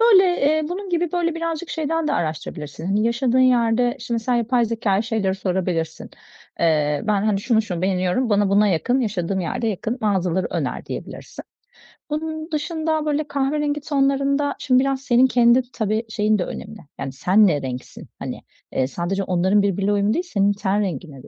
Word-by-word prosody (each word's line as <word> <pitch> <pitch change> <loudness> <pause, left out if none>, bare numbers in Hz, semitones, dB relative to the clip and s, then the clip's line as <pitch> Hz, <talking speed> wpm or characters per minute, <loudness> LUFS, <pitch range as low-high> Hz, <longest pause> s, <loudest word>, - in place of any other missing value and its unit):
böyle, 430 -5 +7 0.2
eee, 310 +2 +3
bunun 385 +3 -5
gibi, 345 -1 0
böyle, 340 -2 0
birazcık 330 0 -3
şeyden 320 0 -1
de - - 0
araştırabilirsin, 160 +2 -3
yaşadığın 235 +3 +1
yerde 245 0 +3
şimdi 235 -1 -2
sen 245 +2 0
yapay 240 +1 +2
zekâya 220 -3 0
şeyleri 220 -5 -1
sorabilirsin: 180 -4 -2 0.5
"Eee, 150 -3 +2
ben, 205 -2 +2
hani, 205 -2 +1
şunu, 220 0 +2
şunu 180 -5 -4
beğeniyorum. 185 +6 0
Bana 205 -1 +3
buna 205 +1 +4
yakın, 245 +9 +1
yaşadığım 195 -4 -1
yerde 185 +6 -2
yakın 220 +4 -3
mağazaları 190 -4 0
öner." - - -3
diyebilirsin. - - -8 0.7
Bunun 315 +1 -4
dışında, 315 0 -1
böyle, 300 0 0
kahverengi 290 +1 -1
tonlarında 275 0 +1
şimdi 255 -2 +3
biraz 270 -1 -1
senin 255 -1 +4
kendi, 245 0 +4
tabii, 220 0 -1
şeyin 215 -1 +1
de 180 - -1
önemli: 215 +1 -8 0.2
Yani, 135 - -4
sen 185 +10 +4
ne 150 -5 +1
renksin? 125 -1 -7
Hani, - - -6 0.3
eee, 130 - +1
sadece 185 +6 -2
onların 190 +3 +2
birbiriyle 200 0 0
uyum 205 +1 +2
değil 350 - 0
senin 200 - +2
ten 200 0 0
rengine 155 -7 -5
de. - - -14
220 Hz, 170 wpm, -22 LUFS, 190-275 Hz, 0.7 s, böyle